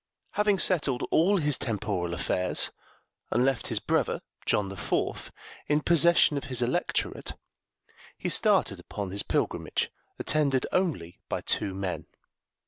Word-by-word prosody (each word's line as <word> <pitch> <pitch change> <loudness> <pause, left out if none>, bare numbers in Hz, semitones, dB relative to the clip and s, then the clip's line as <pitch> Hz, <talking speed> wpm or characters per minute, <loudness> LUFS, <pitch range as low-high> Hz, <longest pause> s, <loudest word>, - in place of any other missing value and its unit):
Having 210 -1 +2
settled 150 -9 +2
all 195 +5 +4
his 150 -5 +1
temporal 90 -6 -2
affairs, 90 0 0 0.6
and 120 +3 +2
left 135 -4 0
his - - -1
brother, - - 0 0.2
John 100 -2 +2
the 100 - -7
Fourth, 95 - -2 0.4
in 150 0 +3
possession 170 -2 +5
of 140 - -4
his 125 -2 0
electorate, 120 - -2 0.8
he - - -4
started - - +3
upon 100 -3 -6
his 100 +1 +2
pilgrimage, - - -1 0.3
attended 140 -4 +1
only 140 - -1
by - - -2
two 95 - 0
men. 95 -2 -4
130 Hz, 135 wpm, -28 LUFS, 100-160 Hz, 0.8 s, possession